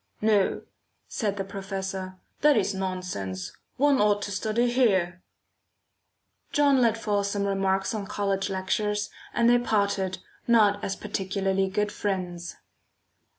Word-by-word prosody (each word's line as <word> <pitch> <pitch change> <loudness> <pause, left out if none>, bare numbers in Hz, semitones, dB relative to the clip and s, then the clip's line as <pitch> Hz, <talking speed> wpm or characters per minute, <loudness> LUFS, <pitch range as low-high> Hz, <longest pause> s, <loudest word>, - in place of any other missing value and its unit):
"No," 210 -2 +2 0.4
said 205 -3 -2
the 195 - -1
professor, 190 -1 -5 0.2
"that 295 -4 +5
is 200 -1 +1
nonsense; 180 - -4 0.2
one 280 -2 +4
ought 205 -1 +3
to 205 - -4
study 220 +4 0
here." 190 -8 +2 1.3
John 285 -3 +4
let 230 -2 +3
fall 205 -3 0
some 200 0 -1
remarks 195 +1 0
on 205 -3 -4
college 200 -1 -1
lectures, 205 +2 -1 0.2
and 235 - +2
they 245 0 +6
parted, 200 -5 0 0.3
not 210 -3 +4
as 195 - -2
particularly 195 -1 -1
good 210 +2 0
friends. 180 -4 -3
200 Hz, 125 wpm, -26 LUFS, 190-215 Hz, 1.3 s, they